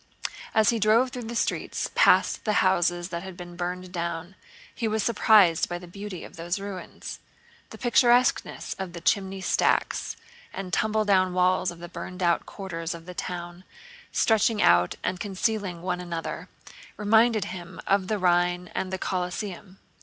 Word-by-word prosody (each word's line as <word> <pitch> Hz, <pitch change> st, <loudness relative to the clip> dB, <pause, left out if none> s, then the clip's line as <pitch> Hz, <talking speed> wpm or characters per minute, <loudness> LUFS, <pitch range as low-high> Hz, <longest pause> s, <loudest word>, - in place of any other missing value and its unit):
As 220 Hz, -1 st, +5 dB
he 230 Hz, -, -1 dB
drove 225 Hz, +5 st, +4 dB
through 250 Hz, -2 st, -6 dB
the 235 Hz, +1 st, -5 dB
streets -, -, -1 dB
past -, -, +4 dB
the 215 Hz, -, +1 dB
houses 175 Hz, -1 st, +2 dB
that 170 Hz, -2 st, -4 dB
had 190 Hz, -1 st, -9 dB
been 175 Hz, -1 st, -9 dB
burned 180 Hz, +1 st, -4 dB
down, 170 Hz, 0 st, -4 dB, 0.4 s
he 230 Hz, -, -2 dB
was 220 Hz, -1 st, 0 dB
surprised 210 Hz, -7 st, +4 dB
by 175 Hz, -, -3 dB
the 175 Hz, -, -10 dB
beauty 195 Hz, 0 st, -7 dB
of -, -, -12 dB
those 175 Hz, +3 st, -2 dB
ruins. 195 Hz, -2 st, -7 dB, 0.5 s
The -, -, -10 dB
picturesqueness 245 Hz, +1 st, +2 dB
of 190 Hz, -3 st, -5 dB
the 170 Hz, -, -6 dB
chimney 195 Hz, 0 st, 0 dB
stacks -, -, +1 dB, 0.3 s
and 185 Hz, -2 st, -6 dB
tumble 215 Hz, +2 st, +1 dB
down 185 Hz, -2 st, +3 dB
walls 185 Hz, 0 st, +3 dB
of 175 Hz, -, -8 dB
the 175 Hz, +1 st, -8 dB
burned 180 Hz, +1 st, -6 dB
out 170 Hz, -1 st, +2 dB
quarters 170 Hz, -4 st, -5 dB
of 165 Hz, -1 st, -11 dB
the 180 Hz, -, -8 dB
town, 175 Hz, 0 st, -6 dB, 0.5 s
stretching 220 Hz, 0 st, +2 dB
out 90 Hz, -, +4 dB
and 185 Hz, -, -1 dB
concealing 195 Hz, -3 st, -2 dB
one 180 Hz, -1 st, -2 dB
another, 170 Hz, -2 st, -5 dB, 0.5 s
reminded 220 Hz, 0 st, +3 dB
him 175 Hz, -2 st, -8 dB
of 195 Hz, -1 st, +2 dB
the 215 Hz, -, 0 dB
Rhine 175 Hz, -1 st, +1 dB
and 185 Hz, -, -3 dB
the 190 Hz, -, -2 dB
Colosseum. 185 Hz, +1 st, -4 dB
185 Hz, 165 wpm, -26 LUFS, 175-210 Hz, 0.5 s, As